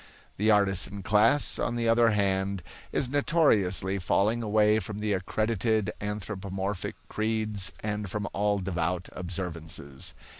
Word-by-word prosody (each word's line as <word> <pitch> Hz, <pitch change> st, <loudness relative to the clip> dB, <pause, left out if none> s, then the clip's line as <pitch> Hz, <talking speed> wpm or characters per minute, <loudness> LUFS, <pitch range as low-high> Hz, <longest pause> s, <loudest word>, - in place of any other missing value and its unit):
The 105 Hz, +2 st, +2 dB
artisan 100 Hz, -1 st, +2 dB
class, 110 Hz, +8 st, +3 dB
on 115 Hz, -, -1 dB
the 115 Hz, -1 st, 0 dB
other 115 Hz, 0 st, +5 dB
hand, 100 Hz, -3 st, 0 dB, 0.3 s
is 130 Hz, -, +1 dB
notoriously 105 Hz, -, +2 dB
falling 105 Hz, +6 st, +1 dB
away 105 Hz, 0 st, +3 dB
from 105 Hz, -1 st, -6 dB
the 105 Hz, -1 st, -1 dB
accredited 110 Hz, +2 st, 0 dB
anthropomorphic 100 Hz, -2 st, -4 dB
creeds 110 Hz, -3 st, -1 dB
and 105 Hz, -1 st, -3 dB
from 105 Hz, +2 st, -3 dB
all 105 Hz, 0 st, +1 dB
devout 90 Hz, -1 st, -2 dB
observances. 85 Hz, -6 st, -5 dB
105 Hz, 120 wpm, -28 LUFS, 95-110 Hz, 0.3 s, other